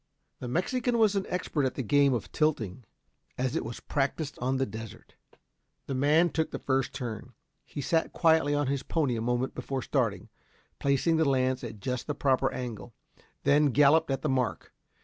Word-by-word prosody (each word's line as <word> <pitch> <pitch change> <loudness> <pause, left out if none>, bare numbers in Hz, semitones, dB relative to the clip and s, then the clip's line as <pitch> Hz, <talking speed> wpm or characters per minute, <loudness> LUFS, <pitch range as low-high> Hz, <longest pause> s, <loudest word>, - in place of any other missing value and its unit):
The 125 - -5
Mexican 235 - 0
was 215 -3 +4
an 195 - -1
expert 165 -5 -1
at 130 - -1
the 135 - -2
game 140 +4 +4
of 115 - -5
tilting 125 - -1 0.5
as 130 +2 -1
it - - 0
was 115 +1 -6
practised 145 +1 -2
on 130 +2 0
the 135 - +1
desert. 115 -3 -9 0.7
The - - -4
man 150 +6 +3
took 160 -1 0
the - - -4
first 135 -1 0
turn. 115 -5 -6 0.3
He 145 - -6
sat 160 +4 +1
quietly 160 -3 +3
on 145 0 +1
his 135 0 -1
pony 145 -7 0
a 110 - -3
moment 125 +2 -1
before 130 0 -4
starting, - - -1 0.5
placing 140 +4 +2
the 160 -3 +3
lance 130 -1 +1
at 110 -3 -7
just 125 +4 -3
the 150 - -2
proper 135 -1 +2
angle 120 -3 -6 0.5
then 150 +1 +4
galloped 145 +4 +4
at 135 -1 -2
the - - +1
mark. 125 -5 -1
135 Hz, 185 wpm, -29 LUFS, 125-155 Hz, 0.7 s, was